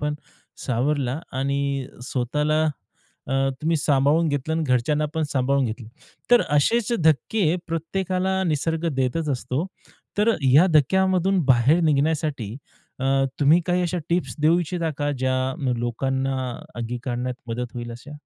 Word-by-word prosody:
पण 150 0 -1 0.5
सावरला 135 +2 0 0.2
आणि 140 +1 0 0.4
स्वतःला 150 +5 0
अ, 150 -2 -8 0.3
तुम्ही 165 +1 +2
सांभाळून 150 +3 +2
घेतलं 145 +2 -1
आणि 160 - 0
घरच्यांना 145 +4 +1
पण 160 - 0
सांभाळून 135 0 +1
घेतलं. 110 0 -6 0.4
तर 245 - +7
असेच 235 +9 +2
धक्के 160 - +2
प्रत्येकाला 185 +3 -1
निसर्ग 165 +1 -1
देतच 140 +5 0
असतो. 130 +5 -2 0.5
तर 225 +2 +4
या 135 +7 +6
धक्क्यामधून 190 +4 +3
बाहेर 130 +6 +4
निघण्यासाठी 145 -6 0 0.4
अ, - - -2 0.4
तुम्ही 150 +5 +5
काही 180 0 +1
अशा 180 0 -1
टिप्स 175 +1 0
देऊ 165 +3 +4
इच्छिता 170 -1 -2
का, 145 0 0
ज्या 130 0 +1 0.2
न, 130 -4 0
लोकांना 130 +3 -1 0.4
अंगीकारण्यात 120 +1 -3
मदत 120 +1 -4
होईल 120 -1 -5
अशा? 120 +5 -11
150 Hz, 130 wpm, -23 LUFS, 130-165 Hz, 0.5 s, तर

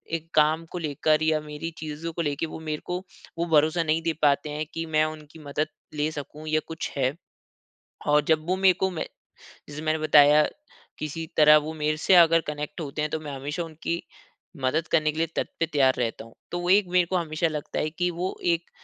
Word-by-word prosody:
एक 165 0 -6
काम 155 +2 +3
को - - -5
लेकर 155 0 +1
या 155 -1 +2
मेरी 150 +2 -6
चीज़ों 155 +2 -5
को 170 - -2
लेके 145 0 -1
वो 160 - -8
मेरे 155 -1 -4
को 180 - -2 0.4
वो 170 - 0
भरोसा 155 +3 +3
नहीं 160 +1 +1
दे 165 0 0
पाते 145 0 +3
हैं 150 +1 -3
कि 165 0 -3
मैं 155 -1 +2
उनकी 155 0 -8
मदद 150 +1 -2 0.3
ले 150 0 0
सकूँ 150 +1 -8
या 155 0 +2
कुछ 165 0 -5
है। 130 0 +1 0.9
और 150 0 +5
जब 155 -1 +2
वो 185 - +2
मेरे 190 -1 +5
को 190 - +2
मे 170 - -3 0.7
जैसे 150 +1 -7
मैंने 155 0 0
बताया 150 -1 +6 0.6
किसी 155 +2 -4
तरह 150 0 +8
वो 155 +1 -3
मेरे 155 0 -1
से 185 +4 +4
अगर 165 -1 +6
कनेक्ट 150 +3 -5
होते 150 0 -4
हैं 150 - 0
तो 160 - -1
मैं 150 -2 -7
हमेशा 145 +6 -4
उनकी 165 +1 -4 0.6
मदद 155 +6 +1
करने 155 -1 +3
के 155 - -10
लिए 165 +1 +1
तत् - - -2
तैयार 135 -3 +3 0.2
हूँ। 115 - -15 0.2
तो 175 - -2
वो 175 0 -2
एक 195 0 +5
मेरे 180 0 +3
को 185 - -2
हमेशा 165 -1 0
लगता 150 -2 -4
है 155 - 0
कि 180 +3 -1
वो 175 +2 -3 0.2
एक 170 +1 -4
155 Hz, 215 wpm, -26 LUFS, 150-165 Hz, 0.9 s, तरह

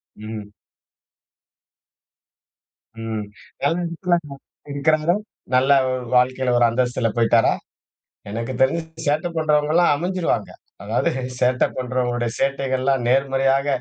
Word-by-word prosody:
ம். 110 -1 -8 2.5
ம். 110 -2 -3 0.4
வேற 140 - +2
எடத்துல 175 +1 0
அவரு 140 -1 -10 0.3
இருக்குறாரா? 155 +4 +2 0.4
நல்ல 130 +2 +4 0.4
வாழ்க்கைல 125 0 +2
ஒரு 120 - +5
அந்தஸ்துல 120 0 0
போய்ட்டாரா? 115 0 +4 0.8
எனக்கு 115 +4 -4
தெரிஞ்சு, 135 +6 +3 0.3
சேட்ட 155 +4 +1
பண்றவங்கலாம் 155 +2 +3
அமஞ்சிருவாங்க. 180 +3 -1 0.3
அதாது - - 0 0.3
சேட்ட 125 0 +2
பண்றவங்களுடைய 125 -2 -1
சேட்டைகள்லாம் 135 -1 0
நேர்மறையாக, 135 +1 +2
130 Hz, 90 wpm, -22 LUFS, 120-150 Hz, 2.5 s, ஒரு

